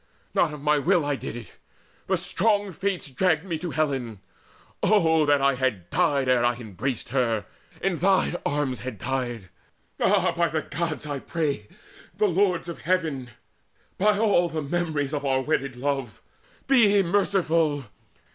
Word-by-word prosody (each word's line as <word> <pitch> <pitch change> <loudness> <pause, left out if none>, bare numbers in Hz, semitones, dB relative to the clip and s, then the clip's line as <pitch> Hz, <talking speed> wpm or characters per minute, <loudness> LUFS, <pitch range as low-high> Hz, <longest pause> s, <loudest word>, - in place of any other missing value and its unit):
Not 165 - +2
of 150 - -7
my 150 0 +3
will 170 +1 +2
I 145 -1 0
did 125 - -6
it: 115 -7 -9 0.6
the 190 - +2
strong 200 +3 +1
Fates 190 -1 -2
Dragged 160 +4 +1
me 170 -4 -3
to 175 - -4
Helen 135 -10 -2 0.6
oh 160 -7 +3
that 145 -1 +4
I 140 0 +4
had 125 -9 -2
died 140 -2 +2
Ere 125 -2 +3
I 120 0 +2
embraced 120 +2 -4
her 115 -6 0 0.4
in 190 -3 +1
thine 190 -1 +2
arms 145 -3 -1
had 125 -4 -6
died! 120 -4 -3 0.5
All, - - +3
by 170 0 +1
the 155 -2 -2
Gods 160 0 -3
I 145 -2 -3
pray, 145 -9 -2 0.5
the 210 - +3
Lords 180 -2 +1
of 170 - -6
Heaven, 155 -7 -1 0.7
By 210 +1 +3
all 205 -5 +3
the 160 -2 -3
memories 155 -2 -1
of 145 -1 -2
our 135 -1 +1
wedded 135 -2 -1
love, 135 -4 -3 0.4
Be 210 -7 +5
merciful! 170 -6 +1
150 Hz, 155 wpm, -25 LUFS, 130-175 Hz, 0.7 s, Be